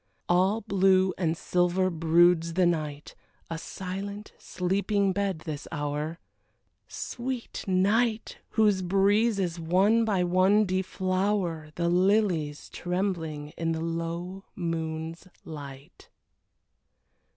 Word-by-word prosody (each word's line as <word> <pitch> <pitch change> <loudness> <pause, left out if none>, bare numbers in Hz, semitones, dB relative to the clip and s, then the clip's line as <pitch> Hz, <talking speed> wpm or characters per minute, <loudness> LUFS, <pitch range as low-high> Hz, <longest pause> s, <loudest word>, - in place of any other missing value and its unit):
All 190 +5 +3
blue 190 -2 +3
and 165 -3 -1
silver 180 +2 +1
broods 165 0 +3
the 185 -1 +4
night, 150 -4 -2 0.4
A 165 - -3
silent, 200 +4 -6
sleeping 195 +2 0
bed, 195 -4 -1
this 150 -2 -5
hour 150 +1 -3 0.7
Sweet 250 -1 -5
night! 215 +5 +1
whose 210 -4 +3
breezes 195 -1 +2
one 190 +8 +3
by 200 -5 +1
one 185 +4 +4
deflower 185 -3 -1
The 170 0 0
lilies 180 -5 +1
trembling 175 -5 -3
in 165 0 0
the 160 - -3
low 170 +3 -4
moon's 165 0 -4 0.2
light. 140 -3 -10
180 Hz, 100 wpm, -27 LUFS, 165-195 Hz, 0.7 s, the